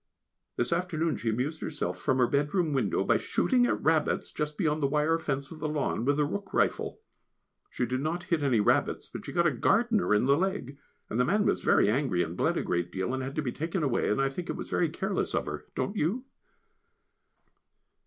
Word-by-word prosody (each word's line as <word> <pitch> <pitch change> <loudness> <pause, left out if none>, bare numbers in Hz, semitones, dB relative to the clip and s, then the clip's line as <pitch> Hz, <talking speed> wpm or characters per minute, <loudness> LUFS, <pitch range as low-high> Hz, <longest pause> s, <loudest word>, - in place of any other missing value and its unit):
This 120 +6 0
afternoon 165 -4 -1
she 115 - -2
amused 130 +8 -2
herself 150 - -3
from 130 -3 +1
her 125 - +5
bedroom 145 +5 +1
window 135 - +1
by - - +3
shooting 245 -2 +2
at - - 0
rabbits 160 -1 +1
just 150 -1 -3
beyond 155 -4 0
the 140 - +3
wire 150 +3 +2
fence 140 -3 -3
of 160 - -9
the 155 0 -2
lawn 145 -6 -1
with 145 +2 +2
a 150 - +3
rook 195 +5 -5
rifle; - - 0 0.7
she 125 - -1
did 130 +2 -2
not 165 +4 -2
hit 170 -3 0
any 130 -6 +2
rabbits, 105 - +1
but - - -6
she - - -6
got 170 -1 +2
a 170 - +4
gardener 210 - +2
in 105 - +2
the 140 +1 +5
leg, 180 -6 -2 0.3
and 115 - -3
the - - +5
man 205 +8 +2
was - - +1
very - - +4
angry, 110 -6 +1
and 80 +2 -5
bled - - +1
a - - -1
great 85 -1 -1
deal, 95 +7 -2
and 130 - -2
had 135 +1 -5
to 155 - -1
be 125 - -2
taken 165 +5 -2
away, 130 -5 +1
and 105 - +1
I 135 0 +2
think 175 +7 -6
it - - -2
was - - -7
very 170 - +2
careless 190 +5 -2
of - - 0
her, - - -6
don't 200 - -2
you? 210 - -1
150 Hz, 225 wpm, -29 LUFS, 130-170 Hz, 0.7 s, her